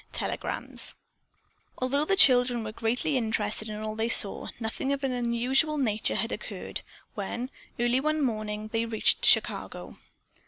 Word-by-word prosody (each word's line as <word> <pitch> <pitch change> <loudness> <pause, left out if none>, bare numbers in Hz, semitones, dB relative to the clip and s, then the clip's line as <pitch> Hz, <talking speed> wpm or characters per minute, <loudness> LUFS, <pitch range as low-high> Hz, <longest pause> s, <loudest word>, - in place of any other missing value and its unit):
TELEGRAMS - - 0 0.8
Although 280 +4 0
the 390 - +1
children 245 -7 +4
were 215 - -6
greatly 235 +6 -2
interested 220 -2 -2
in 210 0 -6
all 215 0 -5
they 225 +1 -2
saw, 205 -3 +7
nothing 230 +4 -3
of 280 0 -3
an 270 - -1
unusual 250 +5 0
nature 220 -6 -1
had - - -2
occurred, - - -7 0.3
when, 235 +6 -5 0.3
early 240 +2 +1
one 305 +1 -1
morning 215 -3 -4
they 230 +1 -2
reached 220 -1 +2
Chicago. - - +1
235 Hz, 145 wpm, -27 LUFS, 220-265 Hz, 0.8 s, saw